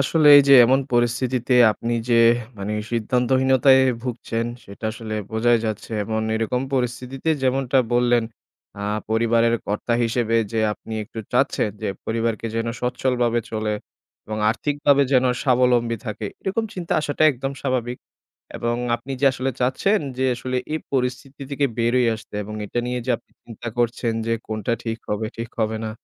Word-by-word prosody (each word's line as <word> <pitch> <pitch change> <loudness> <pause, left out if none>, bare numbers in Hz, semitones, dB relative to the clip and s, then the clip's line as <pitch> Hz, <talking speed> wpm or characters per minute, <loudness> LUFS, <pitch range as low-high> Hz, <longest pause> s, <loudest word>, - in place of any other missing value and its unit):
আসলে 150 +3 +2
এই 145 - +8
যে - - +7
এমন 130 +3 +3
পরিস্থিতিতে 120 +1 +1 0.2
আপনি 115 +2 -4 0.2
যে - - +4 0.4
মানে 100 +2 -3 0.2
সিদ্ধান্তহীনতায় 130 +3 +3 0.2
ভুগছেন। 115 -2 -3 0.2
সেটা 100 +3 -11
আসলে 110 -1 -6 0.2
বোঝাই 115 +2 +3
যাচ্ছে 110 +1 -5
এবং 110 +1 -2
এরকম 115 +3 -1
পরিস্থিতিতে 125 +3 -2
যেমনটা 130 0 +2
বললেন, 120 -1 +3 0.6
আ - - -5 0.3
পরিবারের 115 +1 +3
কর্তা 105 +3 -1
হিসেবে 115 -1 +1 0.2
যে 115 - 0
আপনি 110 +1 -8
একটু 110 - -11
চাচ্ছেন। 125 -4 +1
যে - - -1 0.2
পরিবারকে 115 0 -1
যেন 115 - -1
সচ্ছল 125 +1 -1
ভাবে 120 0 +2
চলে 110 -1 -1 0.5
এবং 110 0 -4
আর্থিকভাবে 145 +2 +2
যেন 130 -1 +4 0.2
স্বাবলম্বী 125 -3 +2
থাকে। 105 0 -4 0.2
এরকম 200 +4 -1
চিন্তা 175 -2 -4
আসাটা 145 0 -2
একদম 135 +2 -4
স্বাভাবিক। 125 -2 -1 0.6
এবং 120 0 -1 0.2
আপনি 120 +4 -9
যে - - +4
আসলে 130 +1 -2
চাচ্ছেন, 130 +12 +2 0.2
যে 130 - +1
আসলে 125 +1 -3 0.2
এই 160 - -1
পরিস্থিতি 130 +2 -2
থেকে 140 0 +1
বের 120 +1 +1
হয়ে 125 -2 +3
আসতে 110 -1 -15
এবং 105 +1 -7
এটা 120 - -2
নিয়ে 125 0 -2
যে 130 - +1
আপনি - - -32
চিন্তা 115 0 -9
করছেন। 120 -1 0
যে 115 - +2
কোনটা 110 +1 -2
ঠিক 115 -1 -3
হবে, 105 +1 -1
ঠিক 115 0 -5
হবে 110 0 0
না? - - -3
120 Hz, 160 wpm, -22 LUFS, 115-130 Hz, 0.6 s, এই